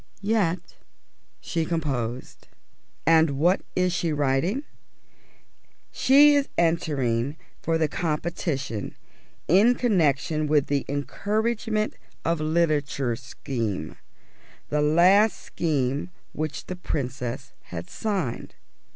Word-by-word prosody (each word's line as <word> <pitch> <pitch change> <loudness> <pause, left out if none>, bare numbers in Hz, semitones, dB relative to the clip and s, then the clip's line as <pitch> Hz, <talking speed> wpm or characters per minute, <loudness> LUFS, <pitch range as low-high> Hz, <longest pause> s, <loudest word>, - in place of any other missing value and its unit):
Yet 195 -5 0 0.6
she 165 -2 -2
composed. 135 -8 -3 0.6
And 160 -4 +4
what 175 +6 +3
is 180 -1 +2
she 170 -2 0
writing? 150 - 0 1.3
She 290 +3 +6
is 285 -1 +2
entering 145 -6 +1 0.2
for 165 0 +1
the 160 -1 +2
competition 150 - -3 0.5
in 210 +9 +5
connection 155 - +1
with 150 -2 +3
the 140 -1 -1
Encouragement 215 +8 -1 0.3
of 165 -1 +1
Literature 150 -6 +1
Scheme: 115 - -4 0.7
the 150 0 +1
last 180 +8 +5
scheme 145 -1 -1 0.2
which 155 0 -4
the 185 - -5
Princess 130 -8 -4
had 85 0 -7
signed. 190 - -3
155 Hz, 95 wpm, -25 LUFS, 135-180 Hz, 1.3 s, She